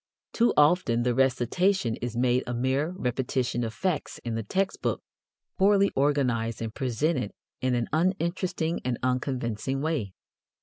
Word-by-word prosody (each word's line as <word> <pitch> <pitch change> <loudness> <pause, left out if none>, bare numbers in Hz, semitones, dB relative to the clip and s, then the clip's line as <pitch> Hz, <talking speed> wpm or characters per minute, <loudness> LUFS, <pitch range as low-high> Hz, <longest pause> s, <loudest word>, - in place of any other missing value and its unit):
Too 235 +1 +3
often 145 -6 +4
the 125 0 +2
recitation 130 - +2
is 120 -1 -4
made 125 +1 +2
a 120 - -2
mere 130 +5 +1
repetition 125 -2 -1
of 115 - -2
facts 160 - -2
in 115 - -2
the 115 - -1
text 190 - -1
book, - - -1 0.6
poorly 200 0 +4
organized 125 -5 +1
and 115 -1 -4
presented 130 -1 0 0.3
in 130 -1 +1
an 120 -1 0
uninteresting 170 -1 0
and 125 -2 -1
unconvincing 130 -1 -1
way. 140 - -2
130 Hz, 140 wpm, -27 LUFS, 120-160 Hz, 0.6 s, often